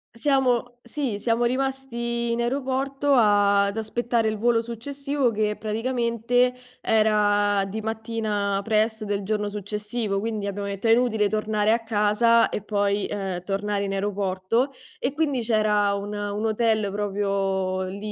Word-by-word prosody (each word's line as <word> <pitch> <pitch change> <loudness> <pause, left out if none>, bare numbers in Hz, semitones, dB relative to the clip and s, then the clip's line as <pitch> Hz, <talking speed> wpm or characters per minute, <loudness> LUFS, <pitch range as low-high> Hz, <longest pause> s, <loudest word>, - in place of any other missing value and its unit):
Siamo 245 -2 +1
sì, 245 -3 -3
siamo 230 +2 0
rimasti 235 -2 -1
in 235 - -1
aeroporto, 270 +2 0
a 205 -3 +4
ad 200 +2 -3
aspettare 230 +1 0
il 215 0 -1
volo 230 +1 +2
successivo, 275 +3 -2
che 210 -1 0
praticamente 235 +2 0 0.3
era 205 -2 +3
di 215 +3 -5
mattina 215 -3 -2
presto 220 0 +1
del 200 -1 -2
giorno 210 0 -1
successivo, 210 +1 -3
quindi 215 -1 -3
abbiamo 200 0 -3
detto: 200 +2 -5
"È - - +5
inutile 225 -4 +3
tornare 215 0 +1
a 230 0 +2
casa 225 +2 +3
e - - -3
poi, 205 -1 0
ehm, 190 -3 -3
tornare 200 +1 -1
in 195 - -3
aeroporto." 200 +5 0 0.3
E 265 +2 -1
quindi 290 -5 0
c'era 210 -3 +2
un 205 +1 -5
un 205 +1 -3
hotel 220 -2 +1
proprio 195 -2 -1
lì 190 +2 -6
215 Hz, 140 wpm, -24 LUFS, 205-235 Hz, 0.3 s, È